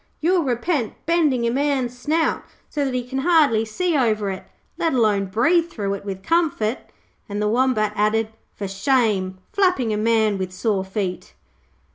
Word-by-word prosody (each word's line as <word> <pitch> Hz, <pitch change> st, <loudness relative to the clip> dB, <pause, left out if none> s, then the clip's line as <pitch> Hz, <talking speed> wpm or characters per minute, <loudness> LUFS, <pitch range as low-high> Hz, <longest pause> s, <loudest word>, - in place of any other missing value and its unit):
You'll 350 Hz, +3 st, +2 dB
repent 255 Hz, -, -1 dB
bending 300 Hz, -8 st, +2 dB
a 235 Hz, -, +1 dB
man's 265 Hz, -2 st, 0 dB
snout 310 Hz, +6 st, 0 dB, 0.3 s
so 290 Hz, -, -1 dB
that 265 Hz, -2 st, -2 dB
he 250 Hz, -, -1 dB
can 265 Hz, +1 st, -3 dB
hardly 285 Hz, -8 st, +4 dB
see 340 Hz, +10 st, -1 dB
over 215 Hz, -7 st, +1 dB
it, 190 Hz, -, -8 dB, 0.3 s
let 330 Hz, -3 st, 0 dB
alone 210 Hz, -5 st, +2 dB
breathe 330 Hz, -, +2 dB
through 200 Hz, -9 st, -3 dB
it 200 Hz, -, -6 dB
with 190 Hz, -1 st, -6 dB
comfort', 275 Hz, -, 0 dB, 0.4 s
and 205 Hz, 0 st, -3 dB
the 210 Hz, -, +1 dB
Wombat 220 Hz, -2 st, +1 dB
added, 215 Hz, +1 st, +1 dB, 0.3 s
'For 200 Hz, -, -4 dB
shame, 195 Hz, -2 st, +1 dB, 0.2 s
flapping 365 Hz, -, +2 dB
a -, -, -1 dB
man 220 Hz, -2 st, +2 dB
with 185 Hz, -1 st, -3 dB
sore 195 Hz, 0 st, -1 dB
feet.' 190 Hz, -2 st, -4 dB
230 Hz, 165 wpm, -22 LUFS, 210-290 Hz, 0.4 s, hardly